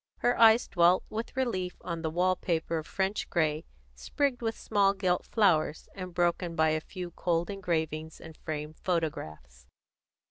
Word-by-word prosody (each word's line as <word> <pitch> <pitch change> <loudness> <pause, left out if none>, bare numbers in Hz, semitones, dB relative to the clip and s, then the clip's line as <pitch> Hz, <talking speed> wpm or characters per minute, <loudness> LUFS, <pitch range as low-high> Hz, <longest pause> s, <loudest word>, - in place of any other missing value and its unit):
Her 245 - +2
eyes 225 +1 +6
dwelt 175 +1 +4
with 225 +3 -5
relief 185 -9 -1
on 170 -2 -4
the 160 - -1
wall 180 +3 +2
paper 165 -2 -1
of 155 - -9
French 195 +1 -2
grey, 155 -2 0 0.3
sprigged 245 - -1
with 225 -1 -2
small 200 -2 +2
gilt 185 -2 0
flowers, 160 -8 +2
and 185 -2 -7
broken 175 0 0
by 160 -1 +3
a 155 0 0
few 180 +1 -7
cold 170 +1 -1
engravings 160 -5 -3
and 160 -1 -11
framed 155 -1 -6
photographs. 80 - -4
175 Hz, 155 wpm, -29 LUFS, 160-195 Hz, 0.3 s, eyes